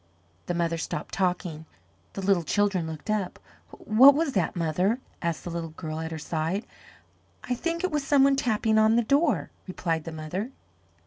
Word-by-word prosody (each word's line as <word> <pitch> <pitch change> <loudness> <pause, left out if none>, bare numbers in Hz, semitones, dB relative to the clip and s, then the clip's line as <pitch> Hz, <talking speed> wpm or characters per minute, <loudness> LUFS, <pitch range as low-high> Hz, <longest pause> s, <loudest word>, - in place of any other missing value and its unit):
The 175 - -1
mother 170 -1 0
stopped - - -5
talking, 175 -4 -1 0.5
the 195 - -5
little 190 -2 +3
children 190 0 +1
looked 160 +6 -5
up. 205 -4 -1 0.3
"What 260 +6 +6
was 305 -2 0
that, 190 -2 0
mother?" 180 +7 +1 0.2
asked 170 -2 -2
the 175 - -5
little 165 -1 -4
girl 155 0 -6
at 160 0 -4
her 160 - -5
side. 165 +6 -2 0.8
"I 250 - -2
think 335 +7 -2
it 370 - 0
was 295 -2 0
some 275 -1 +4
one 275 0 +5
tapping 220 -4 +2
on 220 +1 +5
the 235 - +3
door," 285 +5 +1 0.2
replied 165 -4 -2
the 165 - -5
mother. 160 +8 -4
190 Hz, 180 wpm, -27 LUFS, 165-235 Hz, 0.8 s, What